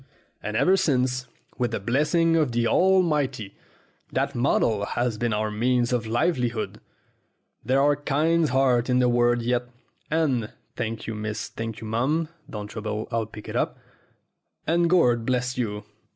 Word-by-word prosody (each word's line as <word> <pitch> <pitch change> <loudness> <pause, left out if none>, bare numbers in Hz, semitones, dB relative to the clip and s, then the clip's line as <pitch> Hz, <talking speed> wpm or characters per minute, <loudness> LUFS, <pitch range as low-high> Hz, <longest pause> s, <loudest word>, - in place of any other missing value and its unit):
And 105 +1 -3
ever 190 +1 +4
since, 130 -7 +1 0.3
with 120 -1 +1
the 115 - -3
blessing 150 - +2
of 150 -7 +1
the 120 0 +1
Almighty, 150 - +2 0.6
that - - 0
model 115 -4 +1
has 120 0 -1
been 120 -1 0
our 105 0 -1
means 120 +3 +1
of 115 -2 -1
livelihood. 120 -2 -1 0.8
There 130 +1 +2
are 145 +1 +4
kind 155 +3 +1
hearts 130 -2 +2
in 125 - +3
the 125 -1 +4
world 120 0 +2
yet, 120 0 0 0.4
and 140 -9 0 0.2
thank 115 -1 -4
you, 110 - -4
miss; 105 0 -4
thank 115 -1 -6
you, - - -7
mum 140 +9 0 0.2
(don't 105 -1 -5
trouble 110 0 -4
I'll 115 -2 -1
pick 105 -1 -11
it - - -6
up) - - 0 0.9
and 170 +1 +2
Gord 125 -10 +4
bless 125 +1 -1
you!" 105 -4 -3
120 Hz, 155 wpm, -25 LUFS, 115-145 Hz, 0.9 s, ever